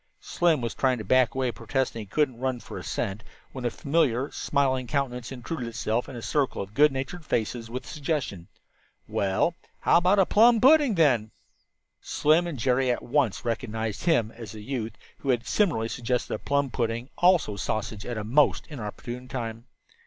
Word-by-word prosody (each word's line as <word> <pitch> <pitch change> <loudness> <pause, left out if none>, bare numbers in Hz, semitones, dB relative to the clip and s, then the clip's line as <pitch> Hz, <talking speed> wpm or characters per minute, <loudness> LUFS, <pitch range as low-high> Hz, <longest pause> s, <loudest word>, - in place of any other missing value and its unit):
Slim 165 -5 +1
was 115 -1 -2
trying 130 -2 +1
to 110 - -5
back 130 +4 +3
away, 130 -2 0
protesting 120 +1 -2
that 105 -3 -8
he - - -18
"couldn't 140 -6 +1
run 130 -1 -1
for - - -8
a - - -9
cent," 100 +3 -3 0.3
when 130 -2 -6
a - - +3
familiar, 140 -1 0
smiling 130 -3 0
countenance 125 -3 -2
intruded 125 0 -5
itself 115 +1 -2
in 135 - -8
the 120 - -7
circle 135 +5 0
of 100 +1 -5
good 150 +4 +5
natured 135 +6 -5
faces 115 -3 -2
with 125 +2 -5
the - - -12
suggestion: 145 - -3 0.6
"Well, 100 - +1 0.3
how - - +5
about 180 +4 +4
a 195 - +5
plum 230 +4 +5
pudding, 275 -2 +5
then?" 130 -10 +3 0.7
Slim 160 +4 +2
and 165 -5 -4
Jerry 130 +1 +2
at 120 - 0
once 125 -5 0
recognized 110 -1 -3
him 120 -11 +2
as 115 -1 -9
the 105 -1 -9
youth 115 -3 -3 0.3
who 140 - -5
had 120 -3 +1
similarly 170 - +1
suggested 125 +1 -2
a - - -3
plum 140 -2 0
pudding, 115 +1 -2
also 175 - +4
sausage, 105 +1 -3
at 120 0 -4
a 105 - -3
most 135 +8 +3
inopportune 120 0 -6
time. 115 -3 -5
125 Hz, 185 wpm, -26 LUFS, 115-145 Hz, 0.7 s, good